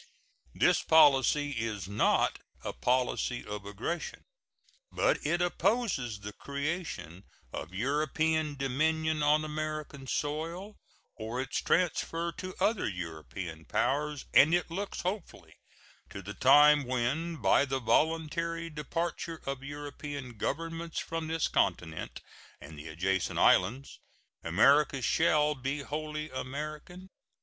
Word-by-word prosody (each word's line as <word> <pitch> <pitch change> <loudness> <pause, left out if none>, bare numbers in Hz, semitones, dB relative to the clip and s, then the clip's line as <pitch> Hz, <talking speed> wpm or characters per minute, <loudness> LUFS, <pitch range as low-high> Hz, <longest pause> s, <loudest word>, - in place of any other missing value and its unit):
This - - +4
policy 145 -1 +5
is 110 -7 -3
not 100 +2 +2 0.2
a - - -4
policy 125 -1 0
of 105 -1 -6
aggression; 115 - -4 0.7
but - - +1
it 175 +4 +1
opposes 175 - 0
the 105 +1 -7
creation 140 - -4 0.3
of - - -5
European 150 +7 0
dominion 155 +3 0
on 150 +1 +3
American 155 -2 -4
soil, 165 +9 -3 0.4
or 115 +3 -4
its 130 0 -2
transfer 170 -1 0
to 185 +2 -7
other 215 - +1
European 80 -2 -6
powers, 145 - -1
and 155 +5 +7
it 175 -1 -1
looks 195 +4 -4
hopefully 185 +1 -5 0.6
to 100 - -8
the 100 +2 -6
time 145 +4 +6
when, 130 +7 -1
by 150 - +4
the 135 -1 -1
voluntary 165 +4 0
departure 165 +2 -3
of 135 -1 -4
European 145 -2 -7
Governments 165 +8 -3
from 165 -1 -4
this 160 -1 0
continent 90 -4 -1 0.4
and 80 - -11
the 75 - -8
adjacent 90 +4 -1
islands, 120 +10 +3 0.4
America 135 - +4
shall 150 +4 +3
be 135 +1 -3
wholly 150 +1 -4
American. 150 +8 -6
145 Hz, 115 wpm, -30 LUFS, 125-160 Hz, 0.7 s, and